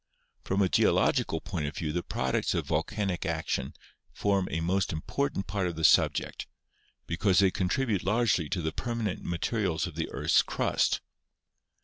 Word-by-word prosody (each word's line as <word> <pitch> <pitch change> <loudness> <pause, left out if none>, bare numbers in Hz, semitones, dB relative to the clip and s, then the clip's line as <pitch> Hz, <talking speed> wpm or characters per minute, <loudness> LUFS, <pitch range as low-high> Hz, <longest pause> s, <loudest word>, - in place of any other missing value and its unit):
From 100 +1 +1
a - - +3
geological 80 -2 +2
point 85 -5 -3
of 75 - -6
view 75 -2 -2
the 90 - 0
products 65 -6 -1
of - - -1
volcanic 95 -4 -1
action 80 -1 -2 0.4
form 100 -2 0
a 80 - -2
most 95 +4 0
important 95 - -2
part 95 -1 -1
of 85 - -4
the 80 - -5
subject, - - +3 0.6
because 90 +2 +1
they 95 -1 +5
contribute 100 +2 0
largely 105 -6 +1
to 90 -4 -2
the 80 - -1
permanent 115 -3 -3
materials 85 0 -1
of - - -6
the - - -3
earth's - - +3
crust. - - 0
95 Hz, 155 wpm, -29 LUFS, 80-100 Hz, 0.6 s, they